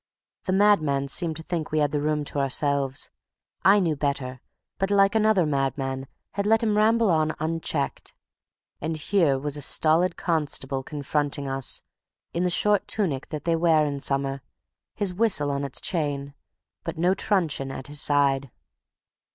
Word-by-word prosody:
The 185 Hz, -, -1 dB
madman 155 Hz, -9 st, +3 dB
seemed 160 Hz, +1 st, 0 dB
to 160 Hz, -, -7 dB
think 165 Hz, -2 st, -3 dB
we 155 Hz, -, -1 dB
had 145 Hz, -1 st, +2 dB
the 145 Hz, 0 st, -1 dB
room 150 Hz, 0 st, 0 dB
to 145 Hz, -, -3 dB
ourselves. 140 Hz, -1 st, +1 dB, 0.5 s
I 200 Hz, +2 st, +6 dB
knew 165 Hz, -5 st, +1 dB
better, 135 Hz, -3 st, -3 dB, 0.4 s
but, 195 Hz, -, 0 dB
like 195 Hz, 0 st, +4 dB
another 215 Hz, -5 st, +3 dB
madman, 135 Hz, -2 st, -2 dB, 0.2 s
had 200 Hz, 0 st, -2 dB
let 225 Hz, +1 st, +3 dB
him 215 Hz, -2 st, +1 dB
ramble 220 Hz, 0 st, +3 dB
on 155 Hz, -1 st, +1 dB
unchecked. 160 Hz, -2 st, -3 dB, 0.7 s
And 160 Hz, 0 st, -2 dB
here 160 Hz, -4 st, +2 dB
was 145 Hz, +1 st, -2 dB
a -, -, -4 dB
stolid 165 Hz, +5 st, +3 dB
constable 145 Hz, -5 st, 0 dB
confronting 145 Hz, 0 st, -2 dB
us, 135 Hz, -1 st, -1 dB, 0.5 s
in 170 Hz, -, -1 dB
the 180 Hz, -, +2 dB
short 205 Hz, +3 st, +1 dB
tunic 160 Hz, -11 st, -1 dB
that 150 Hz, -2 st, -6 dB
they 165 Hz, -1 st, +1 dB
wear 160 Hz, -2 st, +3 dB
in 140 Hz, -1 st, -3 dB
summer, 135 Hz, 0 st, -1 dB, 0.5 s
his 200 Hz, -4 st, -1 dB
whistle 180 Hz, -8 st, +2 dB
on 140 Hz, 0 st, -2 dB
its 140 Hz, -2 st, -1 dB
chain, 145 Hz, -5 st, -2 dB, 0.5 s
but -, -, -5 dB
no 175 Hz, +3 st, +3 dB
truncheon 175 Hz, -9 st, 0 dB
at 135 Hz, -1 st, -7 dB
his 145 Hz, 0 st, -1 dB
side. 140 Hz, -2 st, +2 dB
150 Hz, 160 wpm, -25 LUFS, 140-180 Hz, 0.7 s, I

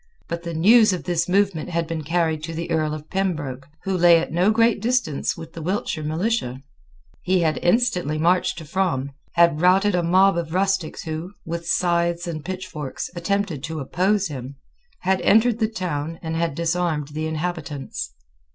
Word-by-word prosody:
But 170 Hz, 0 st, -4 dB
the 170 Hz, -1 st, -5 dB
news 215 Hz, +5 st, +6 dB
of 180 Hz, -, -4 dB
this 175 Hz, -1 st, -1 dB
movement 190 Hz, -3 st, +1 dB
had 170 Hz, -1 st, -1 dB
been 160 Hz, -1 st, -4 dB
carried 160 Hz, 0 st, 0 dB
to 165 Hz, 0 st, -6 dB
the 170 Hz, +1 st, -4 dB
Earl 155 Hz, -2 st, +1 dB
of 155 Hz, 0 st, -9 dB
Pembroke, 155 Hz, -9 st, -2 dB, 0.2 s
who 195 Hz, -1 st, -1 dB
lay 175 Hz, -1 st, +6 dB
at 165 Hz, -, -2 dB
no 180 Hz, +4 st, +3 dB
great 230 Hz, -1 st, +3 dB
distance 235 Hz, -, 0 dB
with 165 Hz, 0 st, -9 dB
the 165 Hz, -, -7 dB
Wiltshire 175 Hz, -2 st, -2 dB
militia. 155 Hz, -, -1 dB, 0.6 s
He 185 Hz, 0 st, +2 dB
had 160 Hz, -2 st, +1 dB
instantly 180 Hz, -, +1 dB
marched 175 Hz, +4 st, +2 dB
to 160 Hz, -, -7 dB
Frome, 145 Hz, -5 st, -1 dB, 0.2 s
had 170 Hz, -3 st, +4 dB
routed 190 Hz, +3 st, +4 dB
a 180 Hz, -, +2 dB
mob 185 Hz, +2 st, +4 dB
of 165 Hz, 0 st, -5 dB
rustics 195 Hz, -3 st, 0 dB
who, 160 Hz, +4 st, -5 dB
with 170 Hz, +1 st, -5 dB
scythes 170 Hz, 0 st, +1 dB
and 160 Hz, -3 st, -5 dB
pitchforks, 180 Hz, -6 st, -5 dB
attempted 185 Hz, -3 st, -1 dB
to 160 Hz, -1 st, -5 dB
oppose 190 Hz, +8 st, +1 dB
him, 135 Hz, -2 st, -7 dB, 0.5 s
had 190 Hz, +1 st, +1 dB
entered 225 Hz, +2 st, +4 dB
the 220 Hz, -1 st, +1 dB
town 165 Hz, -6 st, -3 dB
and 160 Hz, 0 st, -3 dB
had 165 Hz, -3 st, -1 dB
disarmed 165 Hz, -3 st, -1 dB
the 155 Hz, +2 st, -3 dB
inhabitants. 150 Hz, -, -4 dB
170 Hz, 175 wpm, -23 LUFS, 155-185 Hz, 0.6 s, news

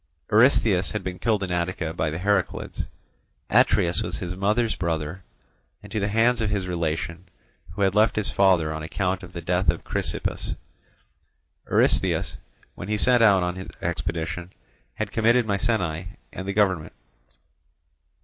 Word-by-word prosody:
Eurystheus 110 Hz, -5 st, +4 dB
had 105 Hz, -, -3 dB
been 90 Hz, -1 st, -5 dB
killed 110 Hz, -4 st, +1 dB
in 90 Hz, -, -3 dB
Attica 85 Hz, -2 st, -2 dB
by 80 Hz, -, -1 dB
the 75 Hz, -, -4 dB
Heraclids. 100 Hz, +1 st, -1 dB, 0.6 s
Atreus 85 Hz, -1 st, +3 dB
was -, -, -3 dB
his 90 Hz, 0 st, -5 dB
mother's 105 Hz, +4 st, +1 dB
brother; 85 Hz, +1 st, -3 dB, 0.6 s
and 105 Hz, -, -12 dB
to 110 Hz, -, -1 dB
the 100 Hz, -, 0 dB
hands 115 Hz, +3 st, +2 dB
of 110 Hz, -, 0 dB
his 100 Hz, -3 st, -1 dB
relation, 85 Hz, 0 st, -3 dB, 0.5 s
who 100 Hz, -, -1 dB
had 95 Hz, -1 st, +2 dB
left 110 Hz, +2 st, +3 dB
his 105 Hz, -, 0 dB
father 90 Hz, -5 st, +3 dB
on 80 Hz, -, -5 dB
account 90 Hz, +4 st, -2 dB
of 90 Hz, -1 st, -11 dB
the 85 Hz, -, -6 dB
death 90 Hz, +2 st, +1 dB
of -, -, 0 dB
Chrysippus, -, -, -2 dB, 1.1 s
Eurystheus, -, -, +2 dB, 0.4 s
when 90 Hz, -, -8 dB
he 105 Hz, 0 st, 0 dB
set 125 Hz, +2 st, +4 dB
out 100 Hz, -5 st, +5 dB
on 90 Hz, 0 st, -1 dB
his 95 Hz, -, -7 dB
expedition, 85 Hz, +2 st, -3 dB, 0.4 s
had 110 Hz, -2 st, -3 dB
committed 115 Hz, +2 st, +3 dB
Mycenæ 95 Hz, -6 st, -1 dB, 0.3 s
and 95 Hz, -, -6 dB
the 100 Hz, -, -1 dB
government. 95 Hz, -6 st, +1 dB
95 Hz, 155 wpm, -24 LUFS, 85-105 Hz, 1.1 s, out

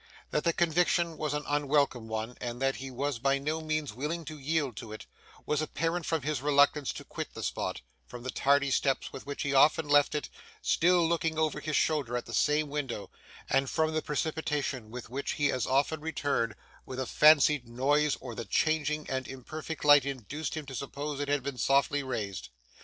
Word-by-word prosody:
That 150 Hz, -, 0 dB
the 170 Hz, -, +4 dB
conviction 170 Hz, 0 st, +2 dB
was 150 Hz, -1 st, -2 dB
an 150 Hz, -, -2 dB
unwelcome 145 Hz, -5 st, +1 dB
one, 110 Hz, +2 st, -4 dB
and 120 Hz, 0 st, -4 dB
that 135 Hz, 0 st, +1 dB
he 135 Hz, 0 st, -6 dB
was 135 Hz, 0 st, -2 dB
by 135 Hz, +2 st, +2 dB
no 155 Hz, +3 st, -2 dB
means 155 Hz, -4 st, -2 dB
willing 155 Hz, +7 st, -3 dB
to 155 Hz, +1 st, -7 dB
yield 145 Hz, -3 st, -1 dB
to 115 Hz, -2 st, -7 dB
it, 110 Hz, -, -8 dB, 0.4 s
was 150 Hz, 0 st, 0 dB
apparent 165 Hz, +2 st, -2 dB
from 160 Hz, -4 st, 0 dB
his 150 Hz, -3 st, -1 dB
reluctance 145 Hz, 0 st, +3 dB
to -, -, -8 dB
quit -, -, -7 dB
the -, -, -6 dB
spot; -, -, -3 dB, 0.3 s
from 120 Hz, -1 st, -9 dB
the 130 Hz, -, -3 dB
tardy 140 Hz, 0 st, +2 dB
steps 135 Hz, 0 st, 0 dB
with 135 Hz, -, -9 dB
which 145 Hz, -, -3 dB
he 140 Hz, -, -1 dB
often 150 Hz, +3 st, +5 dB
left 145 Hz, +1 st, +4 dB
it, 150 Hz, -, -2 dB, 0.3 s
still 175 Hz, 0 st, +3 dB
looking 165 Hz, -1 st, 0 dB
over 155 Hz, -1 st, +1 dB
his 155 Hz, 0 st, -3 dB
shoulder 140 Hz, -7 st, +1 dB
at 120 Hz, -, -5 dB
the -, -, -9 dB
same 150 Hz, +1 st, +2 dB
window; 140 Hz, -7 st, -4 dB, 0.4 s
and 135 Hz, -1 st, +2 dB
from 160 Hz, -1 st, +1 dB
the 155 Hz, -, 0 dB
precipitation 150 Hz, -6 st, -2 dB
with 120 Hz, 0 st, -8 dB
which 140 Hz, +2 st, -2 dB
he 145 Hz, -1 st, +1 dB
as 125 Hz, -, -1 dB
often 140 Hz, +4 st, +1 dB
returned, 145 Hz, -8 st, -1 dB, 0.3 s
when 130 Hz, -, -8 dB
a 130 Hz, -, -1 dB
fancied 150 Hz, -2 st, +5 dB
noise 145 Hz, +4 st, +2 dB
or 125 Hz, -2 st, -7 dB
the 115 Hz, +1 st, -5 dB
changing 155 Hz, +6 st, 0 dB
and 130 Hz, -1 st, -3 dB
imperfect 155 Hz, +4 st, -7 dB
light 145 Hz, -2 st, +8 dB
induced 140 Hz, +3 st, -4 dB
him 155 Hz, -, -4 dB
to 135 Hz, -, -9 dB
suppose 140 Hz, +3 st, -4 dB
it 145 Hz, -, -2 dB
had 145 Hz, -2 st, +1 dB
been 135 Hz, -2 st, -5 dB
softly 140 Hz, +1 st, +3 dB
raised. 110 Hz, -, -4 dB
145 Hz, 200 wpm, -30 LUFS, 130-155 Hz, 0.4 s, light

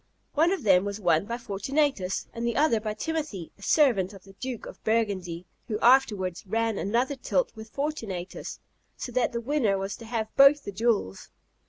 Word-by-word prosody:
One 325 Hz, +4 st, +3 dB
of 385 Hz, -7 st, -2 dB
them 190 Hz, -3 st, +5 dB
was 200 Hz, +1 st, -4 dB
won 170 Hz, -2 st, +2 dB
by 235 Hz, +3 st, -3 dB
Fortunatus, 235 Hz, -1 st, -1 dB
and 230 Hz, -, -5 dB
the 235 Hz, -1 st, 0 dB
other 285 Hz, -6 st, +3 dB
by 215 Hz, 0 st, -4 dB
Timothy, 305 Hz, -, -4 dB
a -, -, -18 dB
servant 210 Hz, -, +3 dB
of 195 Hz, -2 st, -13 dB
the 195 Hz, -, -15 dB
Duke 250 Hz, +2 st, -6 dB
of -, -, -11 dB
Burgundy; 190 Hz, -6 st, -1 dB, 0.2 s
who 215 Hz, -, -1 dB
afterwards 210 Hz, -9 st, +3 dB
ran 225 Hz, +1 st, 0 dB
another 240 Hz, +7 st, 0 dB
tilt -, -, 0 dB
with 220 Hz, 0 st, -10 dB
Fortunatus, 225 Hz, -11 st, -4 dB, 0.4 s
so 245 Hz, -, -5 dB
that 250 Hz, -1 st, +1 dB
the 235 Hz, -, -2 dB
winner 240 Hz, -6 st, +1 dB
was 195 Hz, +1 st, -3 dB
to 230 Hz, -, -11 dB
have 220 Hz, -1 st, -3 dB
both 275 Hz, +1 st, +7 dB
the -, -, -5 dB
jewels. 200 Hz, -, -1 dB
225 Hz, 185 wpm, -27 LUFS, 195-260 Hz, 0.4 s, both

